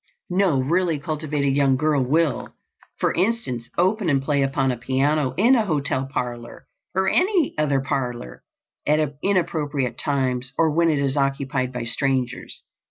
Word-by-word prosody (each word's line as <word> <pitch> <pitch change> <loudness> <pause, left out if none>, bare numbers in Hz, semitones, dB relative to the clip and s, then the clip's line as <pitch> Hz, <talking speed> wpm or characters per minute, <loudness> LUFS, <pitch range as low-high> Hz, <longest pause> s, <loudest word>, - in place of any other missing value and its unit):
No 180 -6 +2
really 165 +4 +1
cultivated 150 -2 -1
young 135 -2 +3
girl 150 -1 +2
will, 155 +4 0 0.4
for - - +1
instance, 175 - -1
open 190 +1 +2
and 140 -2 +3
play 140 +1 0
upon 135 -1 +1
a - - -2
piano 135 +3 0
in 230 +7 +5
a 235 -4 +4
hotel 140 -4 -1
parlor 120 -3 -5 0.3
or 190 0 +1
any 365 - +2
other 145 -3 +1
parlor 125 - -4 0.5
at 150 -1 +1
inappropriate 150 - -1
times 130 -2 -1
or 160 -1 +3
when 165 +2 +3
it 155 - +2
is 140 -1 0
occupied 135 -1 0
by 125 -2 -4
strangers. 130 +1 -2
140 Hz, 150 wpm, -23 LUFS, 130-165 Hz, 0.5 s, in